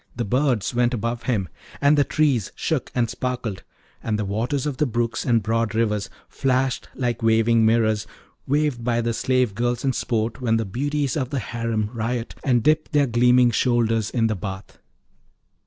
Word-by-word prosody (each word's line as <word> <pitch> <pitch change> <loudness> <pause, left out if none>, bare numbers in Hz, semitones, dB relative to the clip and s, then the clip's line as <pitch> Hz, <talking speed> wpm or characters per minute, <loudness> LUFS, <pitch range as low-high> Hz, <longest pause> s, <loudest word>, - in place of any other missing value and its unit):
The 120 -1 -2
birds 125 -1 +1
went 120 +1 +2
up - - -2
above 115 +2 -3
him, 100 -7 0 0.3
and 145 +1 +4
the 145 - +4
trees 140 -9 +1
shook 155 -6 -2
and 120 -2 +2
sparkled, 125 -4 -4 0.4
and 110 -2 -1
the 105 - -2
waters 120 +8 -1
of 145 -3 -3
brooks 120 -5 -1
and 115 -3 +3
broad 115 0 0
rivers 105 -3 0 0.2
flashed 130 0 -1
like 120 -2 -2
waving 115 0 +3
mirrors 110 -2 +2 0.4
waved 145 -3 0
by 120 0 +1
the 115 0 -1
slave 125 0 +1
girls 120 +4 -1
in 135 - +2
sport 115 +1 -2
when 115 -2 +2
the 115 - -1
beauties 140 +6 -1
of 130 -5 -1
the 140 - -2
harem 115 -3 -2
riot 115 +1 -3
and 120 -5 +2
dip 155 +2 +2
their 145 -2 +3
gleaming 125 0 +4
shoulders 115 -2 +1
in 115 -3 +1
the 110 -1 0
bath. 95 +1 -7
120 Hz, 175 wpm, -23 LUFS, 110-130 Hz, 0.4 s, and